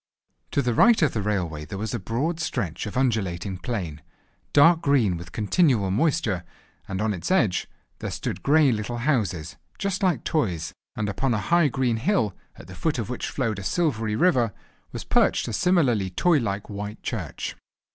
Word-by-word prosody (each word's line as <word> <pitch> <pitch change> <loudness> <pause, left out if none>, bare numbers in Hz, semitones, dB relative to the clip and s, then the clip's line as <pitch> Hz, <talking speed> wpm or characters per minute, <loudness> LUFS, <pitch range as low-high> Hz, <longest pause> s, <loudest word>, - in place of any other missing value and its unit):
To 140 - 0
the 120 -1 +1
right 230 - +6
of 150 - +2
the 110 - -1
railway 90 -7 -2
there 95 - -7
was 110 +1 -3
a - - -1
broad 135 - -2
stretch 105 - -2
of 105 - -5
undulating 100 -7 -1
plain, 90 - -4 0.5
dark 165 +3 +6
green 125 -10 +3
with 85 +1 -7
the - - -14
continual 110 - +2
moisture, 110 - +1 0.4
and 95 -1 -3
on 110 -1 +1
its 90 - -5
edge 115 - +2 0.3
there - - -4
stood - - -4
grey 145 -1 +4
little 110 +2 -2
houses, 95 - -1 0.2
just 200 -1 -2
like 185 -3 +1
toys, 90 - -1 0.2
and 105 -3 -2
upon 120 +4 0
a 105 -2 -3
high 170 -3 +5
green 125 -3 0
hill, 115 - +1 0.2
at - - -12
the 95 - -11
foot 155 - -1
of 115 0 -3
which 125 - -3
flowed 115 -7 -2
a - - -7
silvery 110 - 0
river, 120 - +3 0.4
was - - -6
perched - - +2
a 115 - -4
similarly 125 - +2
toy 155 - +3
like 100 -4 -3
white 105 +1 -6
church. 90 - -4
115 Hz, 185 wpm, -25 LUFS, 95-145 Hz, 0.5 s, right